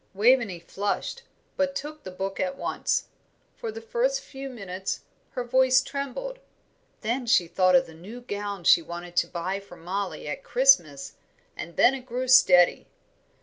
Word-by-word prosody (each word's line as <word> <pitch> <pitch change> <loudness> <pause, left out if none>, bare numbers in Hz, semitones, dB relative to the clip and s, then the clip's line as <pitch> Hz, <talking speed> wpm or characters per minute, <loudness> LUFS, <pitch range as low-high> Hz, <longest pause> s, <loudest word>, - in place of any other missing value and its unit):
Waveney 225 -2 +3
flushed, 200 - -3 0.3
but 280 0 0
she - - -3
took 305 +1 -9
the - - -8
book 195 +1 -5
at 275 -1 -2
once. - - -1 0.5
For 460 -3 -5
the 455 +1 -8
first - - 0
few 270 0 -8
minutes 195 -5 -5 0.3
her 250 - -3
voice 255 +1 +4
trembled: 280 - -5 0.6
then 235 +3 -2
she 190 -8 +4
thought 185 +1 +3
of 175 - +5
the 165 - -13
new 200 +10 -10
gown 205 -4 -5
she 170 - +6
wanted 175 +1 -8
to - - +3
buy 185 +3 -3
for 195 -3 -14
Mollie 185 0 -4
at 150 - -5
Christmas, 170 - +3 0.4
and 170 - -8
then 250 - +5
it 260 -1 -7
grew 255 +1 -3
steady. 180 -9 +6
220 Hz, 165 wpm, -26 LUFS, 180-270 Hz, 0.6 s, she